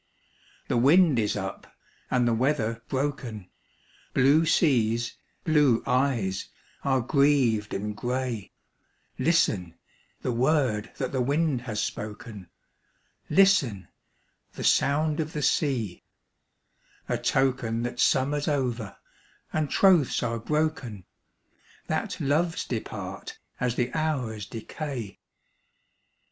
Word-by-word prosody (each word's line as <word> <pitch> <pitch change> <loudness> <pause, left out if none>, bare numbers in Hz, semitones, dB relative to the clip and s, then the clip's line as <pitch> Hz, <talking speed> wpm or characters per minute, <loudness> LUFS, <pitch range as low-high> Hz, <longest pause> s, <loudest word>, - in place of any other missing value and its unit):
The - - +1
wind 145 +2 +5
is 105 -1 0
up, 95 -1 -6 0.3
and 125 -1 +2
the 120 - +2
weather 115 -2 0
broken, 130 -8 -3 0.6
Blue 145 +5 +4
seas, 120 -7 +2 0.3
blue 150 -8 +3
eyes, 125 -8 0 0.3
are 135 -2 +2
grieved 130 -5 +2
and 105 +1 -3
grey, 125 -2 -3 0.7
Listen, 110 - +1 0.5
the 125 - 0
word 125 -4 +1
that - - -2
the 130 - 0
wind 140 0 +1
has 105 -1 -2
spoken, 105 -2 -6 0.8
Listen, 150 - +3 0.6
the - - -7
sound 150 +2 +2
of 160 0 -2
the 150 - -3
sea,—a 125 - 0 1.2
token 125 -4 0
That 120 0 -4
summer's 145 +2 +2
over, 125 -8 -2 0.6
and 155 -2 0
troths 180 -8 +4
are 115 0 -1
broken,— 135 - -2 0.8
That - - -2
loves 160 +5 0
depart 445 - -6 0.2
as 125 -2 0
the 125 0 -1
hours 125 -10 -2
decay. 120 -2 -6
130 Hz, 105 wpm, -27 LUFS, 115-150 Hz, 1.2 s, wind